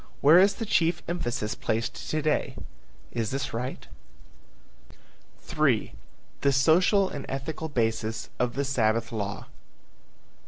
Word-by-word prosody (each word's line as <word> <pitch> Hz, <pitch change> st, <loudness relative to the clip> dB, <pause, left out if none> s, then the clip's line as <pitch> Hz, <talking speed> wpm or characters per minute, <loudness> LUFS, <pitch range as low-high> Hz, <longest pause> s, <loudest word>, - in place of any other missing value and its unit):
Where 155 Hz, +5 st, +8 dB
is 200 Hz, +1 st, +5 dB
the 225 Hz, -, -4 dB
chief 170 Hz, -4 st, +1 dB
emphasis 120 Hz, -11 st, -2 dB
placed 110 Hz, +3 st, -3 dB
to 155 Hz, -, 0 dB
day? 150 Hz, -1 st, 0 dB, 0.6 s
Is 115 Hz, -2 st, -2 dB
this 135 Hz, -1 st, -3 dB
right? 125 Hz, +3 st, -4 dB, 1.6 s
III. -, -, +1 dB, 0.5 s
THE 140 Hz, -, +3 dB
SOCIAL 180 Hz, +8 st, +4 dB
AND 140 Hz, -, -7 dB
ETHICAL 155 Hz, +4 st, -4 dB
BASIS 115 Hz, -4 st, -1 dB
OF 125 Hz, -1 st, 0 dB
THE 140 Hz, +1 st, 0 dB
SABBATH 115 Hz, -3 st, +1 dB
LAW. 105 Hz, -2 st, -4 dB
135 Hz, 120 wpm, -27 LUFS, 115-160 Hz, 1.6 s, Where